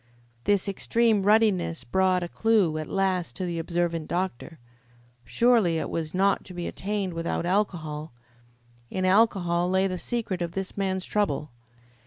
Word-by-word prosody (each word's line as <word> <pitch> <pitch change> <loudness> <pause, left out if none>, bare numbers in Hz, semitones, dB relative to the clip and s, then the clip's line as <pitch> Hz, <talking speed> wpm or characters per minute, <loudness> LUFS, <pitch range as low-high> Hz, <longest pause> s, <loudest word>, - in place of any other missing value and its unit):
This 205 -2 +2
extreme 220 +2 +2
ruddiness 195 - +2
brought 185 +7 +1
a - - -3
clue 195 -6 +2
at 155 - -5
last 190 -3 0
to 185 - -3
the 170 -1 -3
observant 170 -1 -1
doctor. 175 -3 -3 0.7
Surely 225 - +3
it - - -3
was 160 0 -3
not 195 +1 +2
to 185 - -10
be 175 -1 -4
attained 200 -2 -3
without 165 0 -2
alcohol. 165 -5 -1 0.8
In 185 0 -2
alcohol 185 -4 +3
lay 190 +1 +2
the 185 -2 -2
secret 220 -6 -3
of 170 -1 -3
this 195 -1 -4
man's 190 -2 -1
trouble. 200 -8 -1
185 Hz, 150 wpm, -26 LUFS, 170-200 Hz, 0.8 s, Surely